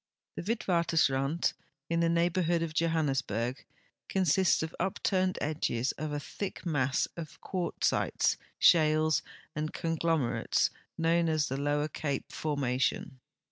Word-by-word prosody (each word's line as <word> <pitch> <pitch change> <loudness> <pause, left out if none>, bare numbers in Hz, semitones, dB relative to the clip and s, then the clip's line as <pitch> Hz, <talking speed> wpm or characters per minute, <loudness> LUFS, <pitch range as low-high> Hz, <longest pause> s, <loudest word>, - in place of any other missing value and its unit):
The - - -4
Witwatersraud, 170 - +1 0.3
in 170 0 0
the 170 0 +3
neighborhood 170 0 +2
of 160 -2 -4
Johannesburg, 135 -7 0 0.5
consists 190 -2 +3
of 160 - -5
ui)turned 185 -1 0
edges 140 -5 0
of 155 +1 -5
a 145 - -2
thick 190 +7 -6
mass 140 -5 +1
of 165 -3 -8
(piartzites, 185 -2 0 0.2
shales, 155 -1 +4 0.3
and 155 0 -2
conglomerates, 165 -5 0 0.3
known 165 0 +2
as 155 -2 +1
the 135 - -2
Lower 145 +1 0
Cape 140 -2 -3
formation. 135 -2 -1
160 Hz, 115 wpm, -30 LUFS, 145-170 Hz, 0.5 s, shales